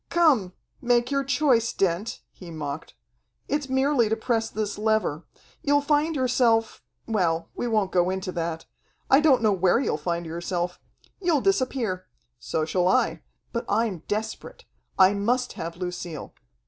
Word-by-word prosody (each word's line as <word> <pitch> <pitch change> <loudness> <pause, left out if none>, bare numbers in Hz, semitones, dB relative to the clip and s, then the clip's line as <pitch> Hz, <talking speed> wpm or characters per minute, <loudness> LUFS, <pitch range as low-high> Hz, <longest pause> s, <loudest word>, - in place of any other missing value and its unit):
"Come, 275 - +3 0.3
make 245 +1 +2
your 275 0 +1
choice, 265 -4 +2
Dent," 195 +3 -1
he 180 - -12
mocked. 155 - -6 0.5
"It's 290 -2 -2
merely 265 -3 +2
to 220 - +2
press 225 0 -1
this 210 -1 -3
lever. 215 -8 0 0.4
You'll 290 -2 +3
find 295 +2 +1
yourself 240 -4 +2 0.2
well, 170 -7 0
we 245 - -3
won't 215 -4 +1
go 175 0 +2
into 190 0 -3
that. 165 -2 -3 0.5
I 270 - +8
don't 285 -6 +4
know 215 -2 +4
where 190 +3 +3
you'll 250 - 0
find 170 +2 -2
yourself. 175 +2 -3 0.4
You'll 335 -6 +2
disappear. 255 - 0 0.3
So 155 - -2
shall 180 +2 +1
I. 185 - +2 0.3
But 235 - -2
I'm 210 -3 +1
desperate. 215 +1 -4 0.3
I 190 +1 +6
must 245 +5 0
have 165 +1 -6
Lucille. 180 -4 -6
215 Hz, 150 wpm, -25 LUFS, 180-255 Hz, 0.5 s, I